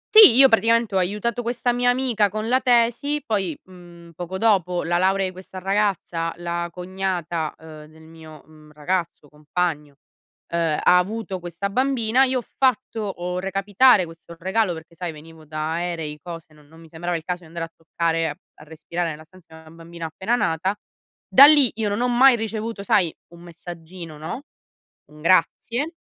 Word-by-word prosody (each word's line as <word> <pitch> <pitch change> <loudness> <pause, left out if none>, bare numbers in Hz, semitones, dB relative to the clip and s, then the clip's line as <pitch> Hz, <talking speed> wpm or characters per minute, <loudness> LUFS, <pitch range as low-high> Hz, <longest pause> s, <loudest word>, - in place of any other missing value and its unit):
Sì, 425 - +10
io 270 +1 +8
praticamente 230 -2 +2
ho 190 - +3
aiutato 210 +6 -1
questa 240 +1 -1
mia 245 0 +2
amica 245 -5 +1
con 215 +2 -4
la 255 +2 +3
tesi, 250 +4 +2
poi, 195 - -2
mhmm, 175 -2 -15
poco 175 +3 -6
dopo 185 -5 +2
la 175 +1 0
laurea 190 +1 +2
i 185 - -3
questa 185 +1 -12
ragazza, 190 -4 -1
la 170 0 -3
cognata, 180 -3 -3
uhm, 155 -1 -12
del 160 +1 -18
mio, 160 -2 -14
mhmm, 155 -1 -18
ragazzo, 165 0 -3
compagno, 150 0 -3 0.6
uhm, 165 -3 0
ha 180 - +5
avuto 195 +1 -2
questa 175 +3 -5
bambina. 255 +1 +2
Io 260 -1 +1
ho - - -6
fatto, 255 -2 -1
ho 180 -3 -4
recapitare 195 +3 +3
questo 165 +1 -13
regalo 190 +1 0
perché 165 +1 -12
sai, 175 -1 -4
venivo 160 +1 -14
da 155 +1 -3
aerei, 165 -3 -4
cose, 165 -1 -10
non 150 -1 -20
non 160 +2 -18
mi 165 - -15
sembrava 175 +2 -3
il 160 - -4
caso 180 0 -4
di 170 - -16
andare 165 +1 -5
a - - -15
toccare, 165 0 -1
a 145 - -6 0.2
a - - -14
respirare 165 +2 -4
nella 155 +1 -10
stanza 170 0 -20
una 160 - -16
bambina 165 0 -8
appena 190 +9 -1
nata. 190 -3 0 0.5
Da 275 +2 +9
lì 290 -5 +6
io 220 -1 -1
non 205 +4 -2
ho 250 - +2
mai 250 +1 +6
ricevuto, 220 -1 -4
sai, 185 -4 +1 0.2
un 170 - -14
messaggino, 170 -1 -10
no? 160 - -6 0.6
Un 150 0 -17
grazie. 235 - +1
180 Hz, 180 wpm, -22 LUFS, 165-220 Hz, 0.6 s, Sì